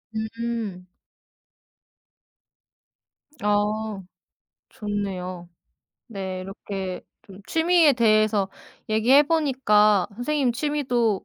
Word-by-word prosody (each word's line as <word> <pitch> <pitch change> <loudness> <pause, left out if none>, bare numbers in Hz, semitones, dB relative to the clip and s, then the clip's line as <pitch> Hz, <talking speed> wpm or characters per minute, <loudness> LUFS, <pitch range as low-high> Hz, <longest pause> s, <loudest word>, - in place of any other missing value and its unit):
음. 220 -4 -4 2.6
아. 210 0 0 0.7
좋네요. 185 -4 -5 0.6
네, 190 -4 -5
이렇게 190 -1 -6 0.2
좀 195 0 -14
취미에 325 -3 +4
대해서 215 -4 +2 0.4
얘기해 240 +7 +5
보니까 245 - +3
선생님 255 +2 0
취미도 245 -6 0
215 Hz, 150 characters per minute, -24 LUFS, 195-245 Hz, 2.6 s, 얘기해